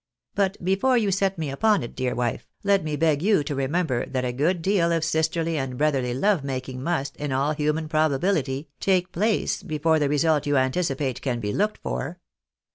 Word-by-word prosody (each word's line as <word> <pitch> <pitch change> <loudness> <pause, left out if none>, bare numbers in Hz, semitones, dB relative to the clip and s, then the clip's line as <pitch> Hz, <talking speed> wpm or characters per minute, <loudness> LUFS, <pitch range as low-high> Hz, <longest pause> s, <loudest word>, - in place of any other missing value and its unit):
But 195 -1 0
before 220 +8 +3
you 210 -4 +1
set 195 0 +1
me 155 -4 -3
upon 210 - +2
it, 120 - -8
dear 125 -1 -1
vnfe, 120 -2 -1 0.2
let 200 -2 +3
me 155 -1 -2
beg 155 -1 +2
you 200 -5 +3
to 145 - -3
remember 140 -1 0
that 130 -1 -2
a 125 - -1
good 165 +7 0
deal 185 -3 +2
of 165 -1 +1
sisterly 160 0 0
and 130 -2 -4
brotherly 135 -4 +1
love 190 +2 +2
making 130 -1 -4
must, 140 -2 -2
in 145 -1 -3
all 135 +3 +1
human 150 +1 -1
probability, 155 -2 0
take 185 -2 +1
place 210 +4 0
before 160 -3 +1
the 145 -2 +1
result 150 0 +2
you 145 -1 +2
anticipate 130 -2 0
can 125 -3 -1
be 105 -2 -3
looked 210 +2 0
for. 165 +6 -3
155 Hz, 195 wpm, -24 LUFS, 135-180 Hz, 0.2 s, before